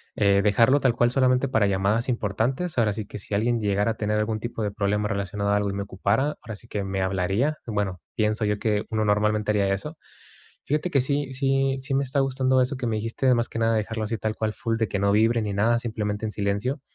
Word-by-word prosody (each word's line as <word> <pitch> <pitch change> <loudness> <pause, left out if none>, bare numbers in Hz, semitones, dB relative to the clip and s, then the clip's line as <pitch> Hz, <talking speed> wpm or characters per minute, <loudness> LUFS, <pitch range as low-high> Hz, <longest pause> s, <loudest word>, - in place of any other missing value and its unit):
eh, 100 -1 +3
dejarlo 115 +7 +4
tal 125 -3 +3
cual, 120 0 +2
solamente 130 +1 +2
para 110 -5 +2
llamadas 100 +5 +1
importantes, 125 - -1
ahora 110 -3 +3
sí 105 0 -4
que, - - -8
si 100 - -7
alguien 115 +3 +1
llegara 105 +2 +1
a - - -2
tener 105 0 0
algún 110 0 -1
tipo 120 -1 -5
de 105 - -1
problema 105 +1 0
relacionado 100 -1 -2
a 105 - +3
algo 105 0 0
y 100 - -3
me 100 - -3
ocupara, 100 +9 0
ahora 110 -2 -7
sí 115 - -13
que, 105 -3 -3
me 95 0 -2
hablaría, 95 +11 0
bueno, 100 -5 -2
pienso 110 -2 0
yo 105 0 0
que, 105 -2 0
uno 110 -1 0
normalmente 105 +1 +1
haría 100 -2 +2
eso, 150 +11 -5 0.7
fíjate 150 +5 0
que 135 - +3
sí 140 0 -1
sí 135 0 +1
sí 135 +1 -3
me 140 - +2
está 135 +1 -1
gustando 130 -1 +2
eso 130 +1 -1
que 125 - -3
me 115 - 0
dijiste, 115 +4 +1
más 120 -1 0
que 115 - -4
nada, 115 0 +2
de 110 - +2
dejarlo 110 +1 -3
así 115 +1 -2
tal 110 0 -2
cual, 110 -1 -2
full 115 0 -2
de 110 - 0
que 100 - -2
no 100 0 +2
vibre 115 +2 +3
ni 105 -1 -2
nada, 115 +4 +2
simplemente 110 -3 -3
en 105 - -3
silencio, 105 +8 -2
110 Hz, 245 wpm, -25 LUFS, 105-125 Hz, 0.7 s, dejarlo